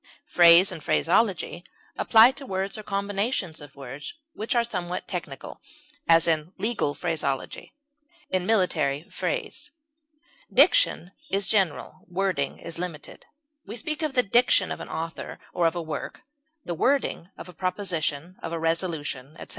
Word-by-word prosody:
Phrase 175 +2 +7
and 160 - -7
phraseology 175 -2 +1 0.3
apply 225 +2 +7
to 275 +1 -9
words 190 +1 -2
or 215 - -5
combinations 200 - -2
of 145 -2 -12
words 140 - -8 0.2
which 225 +4 -2
are 235 - +4
somewhat 180 -6 -4
technical; 150 -7 -6 0.5
as, 165 0 +6
in 160 +2 +1
legal 210 -10 -1
phraseology; 150 - -3 0.5
in 185 -1 -1
military 160 -8 +1
phrase. - - -3 0.8
Diction - - +4 0.2
is 195 0 0
general; 190 -9 0
wording 180 -6 -1
is 170 0 -6
limited; 170 -4 -7 0.4
we - - -6
speak 305 +5 -3
of 305 -4 -2
the 250 - +4
diction 220 -3 +3
of - - -4
an - - -8
author 165 0 -5 0.2
or 175 -2 +3
of 165 - -1
a 170 - -3
work, 155 -1 -6 0.4
the 175 - -2
wording 255 - 0
of - - -9
a 180 - -11
proposition, 180 -3 -2
of 165 - -5
a 170 - -2
resolution, 160 -4 -2
etc. - - -10
180 Hz, 145 wpm, -26 LUFS, 160-205 Hz, 0.8 s, Phrase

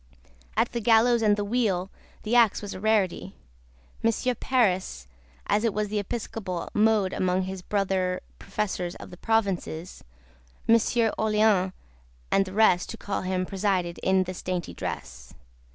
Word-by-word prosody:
At - - +2
the 235 - -3
gallows 230 +2 +4
and 210 -2 +3
the 205 - -1
wheel 200 -5 0 0.3
the 220 +3 0
axe 230 -4 +5
was 205 - -5
a - - -7
rarity 210 -3 0 0.7
Monsieur 230 +3 +1
Paris, 190 - 0 0.4
as 210 +2 +1
it 225 -3 0
was 210 -1 -1
the 210 0 -1
episcopal 205 -3 -4
mode 210 -3 +3
among 185 0 +1
his 190 0 -5
brother 185 -2 -1 0.2
Professors 195 -3 -3
of - - -11
the 180 - -10
provinces, 190 -6 -1 0.6
Monsieur 230 0 +3
Orleans, 215 -3 +3 0.6
and 195 - +3
the 185 - -8
rest, 200 -4 +3
to 225 - -6
call 200 -2 -3
him, 185 0 -1
presided 185 -3 -1
in 190 0 +2
this 185 0 -7
dainty 180 -2 -3
dress. - - -7
200 Hz, 150 wpm, -26 LUFS, 185-220 Hz, 0.7 s, axe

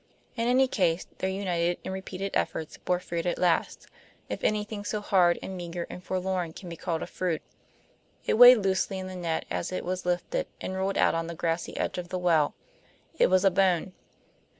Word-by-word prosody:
In 230 -1 0
any 260 +2 +4
case, 180 -7 +1
their 190 - 0
united 175 -3 0
and 190 - -3
repeated 190 +1 -5
efforts 160 - -2
bore 180 -1 0
fruit 170 -1 -3
at 175 - 0
last, 175 -2 +1 0.4
if - - -5
anything 210 0 -1
so 210 +1 -2
hard 180 -4 +3
and 190 - -5
meager 175 -1 -5
and 180 - -8
forlorn 185 -3 -2
can 180 - -9
be 170 - -6
called 165 -1 -3
a - - -3
fruit. 175 -4 -2 0.8
It - - +2
weighed 245 +2 +10
loosely 195 -1 0
in 185 - -5
the 185 0 -7
net 170 -3 -2
as 90 0 -2
it 185 - -3
was 185 +1 -2
lifted, 180 - -1
and 185 - -4
rolled 190 +1 -1
out - - +4
on 165 0 -1
the 170 - -6
grassy 165 +1 -2
edge - - -2
of 175 -1 -7
the 185 - -2
well; 165 -5 +2 0.6
it - - +6
was 185 +1 +4
a 195 - +6
bone. 185 -1 +2
185 Hz, 200 wpm, -28 LUFS, 170-195 Hz, 0.8 s, weighed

